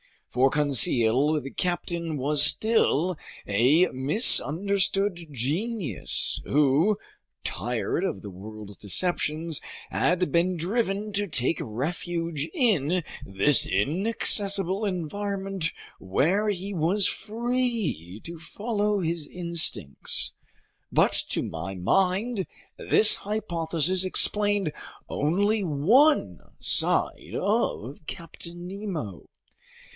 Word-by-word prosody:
For 130 Hz, +2 st, +2 dB
Conseil, 140 Hz, 0 st, +2 dB
the 135 Hz, -, -8 dB
captain 170 Hz, -3 st, -3 dB
was 145 Hz, +2 st, +1 dB
still 180 Hz, -1 st, +4 dB, 0.3 s
a 130 Hz, -, +3 dB
misunderstood 190 Hz, -, +3 dB
genius 160 Hz, -, -2 dB
who, 150 Hz, +8 st, +2 dB, 0.5 s
tired 120 Hz, -, -3 dB
of 95 Hz, -, -4 dB
the 100 Hz, -, -9 dB
world's 105 Hz, +2 st, -10 dB
deceptions, 155 Hz, -, -2 dB, 0.3 s
had 180 Hz, +1 st, 0 dB
been 175 Hz, +2 st, +1 dB
driven 200 Hz, +3 st, -2 dB
to 205 Hz, 0 st, 0 dB
take 145 Hz, -1 st, -1 dB
refuge 165 Hz, +5 st, -4 dB
in 180 Hz, -, +1 dB, 0.2 s
this 100 Hz, +9 st, +4 dB
inaccessible 195 Hz, -, +2 dB
environment 195 Hz, 0 st, -3 dB, 0.3 s
where 170 Hz, -, 0 dB
he 200 Hz, 0 st, -3 dB
was 180 Hz, +4 st, +1 dB
free 225 Hz, -, -3 dB
to 170 Hz, 0 st, -8 dB
follow 205 Hz, +3 st, -2 dB
his 165 Hz, -2 st, -2 dB
instincts. 170 Hz, -, -1 dB, 0.6 s
But -, -, +3 dB, 0.2 s
to -, -, -1 dB
my 90 Hz, +4 st, -6 dB
mind, 190 Hz, -, 0 dB, 0.3 s
this 215 Hz, -, +5 dB
hypothesis 180 Hz, -4 st, -1 dB
explained 205 Hz, -2 st, +1 dB, 0.4 s
only 200 Hz, +8 st, 0 dB
one 215 Hz, -, +2 dB, 0.2 s
side -, -, 0 dB
of 200 Hz, -, -2 dB
Captain 170 Hz, +1 st, -9 dB
Nemo. 180 Hz, -, -6 dB
170 Hz, 90 wpm, -25 LUFS, 145-200 Hz, 0.6 s, this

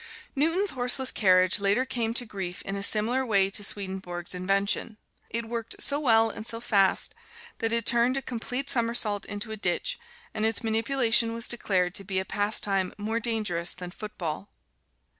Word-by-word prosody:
Newton's 330 Hz, +8 st, +1 dB
horseless 255 Hz, +1 st, +3 dB
carriage 185 Hz, -2 st, +3 dB
later 200 Hz, +6 st, +1 dB
came 235 Hz, -3 st, -3 dB
to 245 Hz, -, +1 dB
grief 190 Hz, -4 st, -6 dB
in 195 Hz, -, -5 dB
a 200 Hz, -, -4 dB
similar 225 Hz, +6 st, +3 dB
way 200 Hz, -5 st, +2 dB
to 205 Hz, -, +1 dB
Swedenborg's 190 Hz, -3 st, -1 dB
invention 195 Hz, +4 st, -1 dB, 0.3 s
it 230 Hz, 0 st, -3 dB
worked 230 Hz, -1 st, -4 dB
so 285 Hz, 0 st, +2 dB
well 225 Hz, -5 st, +3 dB
and 220 Hz, -, -7 dB
so 230 Hz, -, 0 dB
fast 200 Hz, -5 st, +1 dB, 0.5 s
that 225 Hz, -1 st, -1 dB
it 230 Hz, -1 st, 0 dB
turned 240 Hz, +2 st, +2 dB
a -, -, -2 dB
complete 250 Hz, +3 st, -4 dB
somersault 230 Hz, -5 st, +2 dB
into 205 Hz, +2 st, -5 dB
a 220 Hz, -, -4 dB
ditch, 200 Hz, -, -1 dB, 0.3 s
and 215 Hz, -, -3 dB
its 225 Hz, +1 st, +1 dB
manipulation 230 Hz, 0 st, +2 dB
was 230 Hz, 0 st, -1 dB
declared 185 Hz, -6 st, 0 dB
to 195 Hz, -, -3 dB
be 190 Hz, 0 st, -2 dB
a 190 Hz, -, 0 dB
pastime 200 Hz, -2 st, -1 dB
more 220 Hz, +2 st, -3 dB
dangerous 210 Hz, -7 st, 0 dB
than 180 Hz, -1 st, -8 dB
football. 195 Hz, -3 st, -6 dB
220 Hz, 170 wpm, -26 LUFS, 195-235 Hz, 0.5 s, horseless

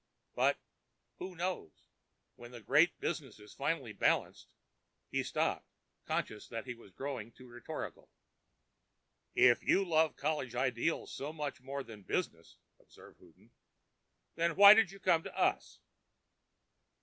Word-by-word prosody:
But—who 185 Hz, 0 st, -4 dB
knows—when 165 Hz, -, -8 dB
the 120 Hz, -1 st, -10 dB
Great 110 Hz, -, +3 dB
Business -, -, -4 dB
is 105 Hz, 0 st, -14 dB
finally 135 Hz, -5 st, -2 dB
balanced——" -, -, 0 dB, 0.6 s
He -, -, 0 dB
stopped, -, -, -1 dB, 0.4 s
conscious 105 Hz, -1 st, -3 dB
that 115 Hz, 0 st, -6 dB
he 125 Hz, -, -5 dB
was 115 Hz, -4 st, -17 dB
growing 125 Hz, -1 st, -6 dB
too 125 Hz, +2 st, -15 dB
rhetorical. 120 Hz, -1 st, -8 dB, 1.3 s
"If 120 Hz, -1 st, +5 dB
you 195 Hz, -, +2 dB
loved 160 Hz, -2 st, +2 dB
college 145 Hz, -5 st, -2 dB
ideals 130 Hz, +5 st, -1 dB
so 145 Hz, +2 st, -5 dB
much 150 Hz, -4 st, -5 dB
more 140 Hz, +1 st, -5 dB
than 110 Hz, -4 st, -12 dB
business," -, -, -4 dB, 0.2 s
observed -, -, -18 dB
Houghton, -, -, -22 dB, 0.8 s
"then 170 Hz, 0 st, 0 dB
why 200 Hz, 0 st, +11 dB
did 220 Hz, -3 st, +4 dB
you 195 Hz, +1 st, -12 dB
come 165 Hz, -4 st, +3 dB
to -, -, -9 dB
us?" -, -, 0 dB
135 Hz, 125 wpm, -33 LUFS, 120-165 Hz, 1.3 s, why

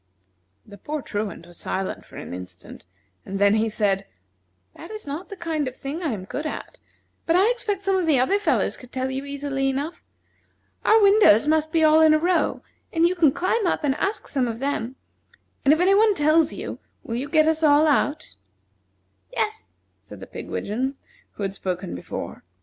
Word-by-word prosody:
The 205 Hz, -, -13 dB
poor 300 Hz, +5 st, -4 dB
Truant 205 Hz, -5 st, -4 dB
was 175 Hz, -1 st, -12 dB
silent 190 Hz, 0 st, -4 dB
for -, -, -13 dB
an -, -, -7 dB
instant, 90 Hz, 0 st, -10 dB, 0.4 s
and 195 Hz, -, -5 dB
then 200 Hz, +1 st, +4 dB
he 220 Hz, +1 st, +2 dB
said: 200 Hz, -3 st, 0 dB, 0.7 s
"That 335 Hz, -, -11 dB
is 430 Hz, 0 st, -7 dB
not 295 Hz, +5 st, -6 dB
the 400 Hz, -, -7 dB
kind 320 Hz, -5 st, -2 dB
of 255 Hz, -, -6 dB
thing 280 Hz, +6 st, -5 dB
I 320 Hz, -6 st, -1 dB
am 195 Hz, -4 st, -5 dB
good 295 Hz, +9 st, -4 dB
at, -, -, -7 dB, 0.5 s
but 330 Hz, -, +3 dB
I 395 Hz, +6 st, +5 dB
expect 420 Hz, -5 st, -2 dB
some 390 Hz, -1 st, +2 dB
of 360 Hz, -3 st, 0 dB
the 290 Hz, -5 st, +4 dB
other 385 Hz, +11 st, +2 dB
fellows 410 Hz, -, +1 dB
could 250 Hz, -1 st, -14 dB
tell 260 Hz, 0 st, -2 dB
you 265 Hz, +1 st, -4 dB
easily 280 Hz, -1 st, -2 dB
enough. 285 Hz, +5 st, -4 dB, 0.8 s
Our 440 Hz, -, +5 dB
windows 395 Hz, -, +6 dB
must 315 Hz, 0 st, +2 dB
be 325 Hz, 0 st, +2 dB
all 310 Hz, 0 st, +6 dB
in 310 Hz, -1 st, +6 dB
a -, -, +5 dB
row, 345 Hz, +2 st, +1 dB, 0.3 s
and 335 Hz, 0 st, +3 dB
you 355 Hz, -, 0 dB
can 330 Hz, -6 st, +4 dB
climb 375 Hz, +6 st, 0 dB
up 335 Hz, -, 0 dB
and 280 Hz, -2 st, +2 dB
ask 390 Hz, +9 st, -2 dB
some 260 Hz, -4 st, 0 dB
of 225 Hz, -1 st, -4 dB
them; 260 Hz, -2 st, -2 dB, 0.7 s
and 275 Hz, -, +5 dB
if 315 Hz, -, +4 dB
any 370 Hz, +2 st, +4 dB
one 420 Hz, 0 st, +4 dB
tells 310 Hz, +1 st, +3 dB
you, -, -, -6 dB, 0.2 s
will 230 Hz, -, -6 dB
you 265 Hz, +4 st, -3 dB
get 310 Hz, +1 st, +4 dB
us 320 Hz, 0 st, +2 dB
all 300 Hz, 0 st, +5 dB
out?" 295 Hz, 0 st, +1 dB, 1.0 s
"Yes," 435 Hz, -3 st, -2 dB, 0.3 s
said -, -, -12 dB
the -, -, -8 dB
pigwidgeon 255 Hz, +7 st, -4 dB, 0.4 s
who 205 Hz, -, -6 dB
had 195 Hz, -1 st, -2 dB
spoken 185 Hz, -1 st, -4 dB
before. 90 Hz, -, -7 dB
295 Hz, 195 wpm, -24 LUFS, 235-335 Hz, 1.0 s, windows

